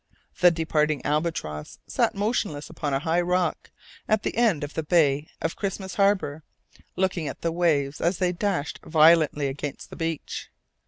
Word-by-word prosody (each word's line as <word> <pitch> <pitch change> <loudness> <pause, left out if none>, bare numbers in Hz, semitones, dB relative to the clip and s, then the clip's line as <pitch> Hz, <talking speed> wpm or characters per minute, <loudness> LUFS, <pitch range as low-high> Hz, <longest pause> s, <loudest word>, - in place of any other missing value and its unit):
The 180 - +7
departing 155 -3 0
albatross 150 - -2
sat - - 0
motionless 200 -8 -2
upon 145 - -3
a 135 - +2
high 165 +2 +1
rock, 180 +1 0 0.4
at 215 0 +2
the - - -2
end 220 -10 +2
of 145 - -5
the - - -1
bay 150 -2 +2
of 165 - -1
Christmas 195 -1 -4
Harbour, 195 -7 +1 0.5
looking 185 -4 0
at - - -6
the 165 - 0
waves 150 -4 +1
as 175 +2 +1
they 180 -1 +1
dashed 180 -4 -2
violently 155 -2 +4
against 140 +1 -5
the - - -8
beach. 165 -2 -4
165 Hz, 160 wpm, -25 LUFS, 150-180 Hz, 0.5 s, The